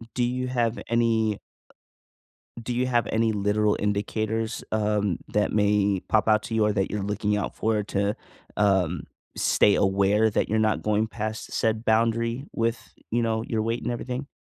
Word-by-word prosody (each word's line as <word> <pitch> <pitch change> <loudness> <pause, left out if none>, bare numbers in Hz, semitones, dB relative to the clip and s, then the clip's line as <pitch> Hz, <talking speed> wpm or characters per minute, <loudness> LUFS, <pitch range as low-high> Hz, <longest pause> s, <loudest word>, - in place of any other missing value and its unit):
Do 125 - +1
you 125 +1 -1
have 120 -2 0
any 115 -2 +1 1.2
do 120 +1 -3
you 125 +1 +1
have 120 -4 +1
any 110 0 +2
literal 105 +1 +1
indicators, 110 +2 -2
um, 105 -4 0
that 105 0 +1
may 100 -2 +2
pop 110 0 +2
out 110 0 +4
to 115 - -4
you 110 -1 +3
or 105 - +2
that 95 -2 -1
you're 105 -1 -2
looking 105 +1 -1
out 105 - -3
for 110 -1 0
to, 100 0 -1 0.4
um, 95 -5 +1 0.3
stay 100 - +3
aware 100 +3 +3
that 105 - 0
you're 110 - +1
not 110 -1 +1
going 105 +1 +1
past 110 -1 -5
said 110 0 0
boundary 115 +3 +1
with, 115 +1 -2 0.2
you 120 +1 +1
know, 110 -1 0
your 110 -2 -1
weight 115 +2 -2
and 120 - -2
everything? 125 +3 -4
110 Hz, 170 wpm, -25 LUFS, 105-115 Hz, 1.2 s, out